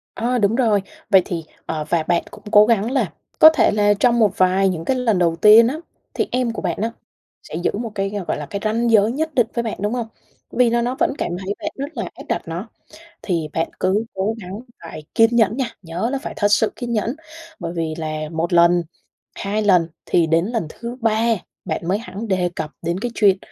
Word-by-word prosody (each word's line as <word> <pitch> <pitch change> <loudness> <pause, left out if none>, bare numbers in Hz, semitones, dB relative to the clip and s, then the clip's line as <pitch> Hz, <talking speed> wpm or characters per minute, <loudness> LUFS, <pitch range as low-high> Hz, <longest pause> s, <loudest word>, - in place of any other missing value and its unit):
Ơ, 245 +2 0
đúng 210 0 +2
rồi. 225 -5 +2 0.3
Vậy 190 -2 +6
thì 170 -4 -4 0.2
ờ, 155 -2 -3
và 170 -2 +1
bạn 170 +1 +1
cũng - - -13
cố 210 0 +7
gắng 225 0 +1
là 235 -11 0 0.3
có 315 - +11
thể 320 - +3
là 205 0 +3
trong 240 0 +3
một 215 -5 +2
vài 185 +1 +3
những 165 -3 -4
cái 260 - +1
lần 225 -6 +1
đầu 170 -2 +2
tiên 215 +6 +7
á, 265 - -2 0.4
thì - - -1
em 250 -2 0
của - - -5
bạn - - -2
á 225 +1 -1 0.5
sẽ - - -9
giữ 175 - 0
một 230 0 -4
cái, 195 0 -1 0.2
gọi - - -1
là, 150 - -5
cái 200 +6 -5
ranh 230 +2 +1
giới 215 0 +5
nhất 315 +4 -2
định 245 -3 +3
với 235 - -1
bạn, 225 - -4
đúng 210 +2 -1
hông? 240 -2 -2 0.4
Vì 245 -1 +3
nó 235 +1 +1
nó 245 +2 -1
vẫn - - +2
cảm - - -2
thấy 195 +2 -2
bạn - - -3
rất 280 +2 -6
là 230 - -3
áp - - -11
đặt - - 0
nó, 175 +7 -5 0.5
thì 170 -5 -1
bạn 165 0 -1
cứ 200 +4 +1
cố 200 +4 -1
gắng 190 +2 -7 0.2
phải 155 -2 -8
kiên 230 0 +4
nhẫn 225 0 +3
nha, 260 -3 -1
nhớ 175 +6 -3
là 275 - -1
phải - - -6
thật 205 - +3
sự 215 +1 +3
kiên 240 -1 -4
nhẫn. 230 +4 -1 0.4
Bởi 170 0 -5
vì 165 -2 -2
là 155 -1 -4
1 165 +2 -2
lần, 170 0 +5 0.5
2 210 +2 -2
lần 180 -5 +4 0.2
thì 170 -2 +2
đến 165 +2 +2
lần 225 -4 -2
thứ 235 +7 -7
3 225 +1 +2 0.3
bạn 170 - -3
mới 190 - +2
hẳn 225 0 -7
đề 185 -3 +1
cập 155 -1 -4
đến 170 +2 -2
cái 240 +1 -3
chuyện 200 -3 +4
210 Hz, 235 wpm, -20 LUFS, 175-235 Hz, 0.5 s, có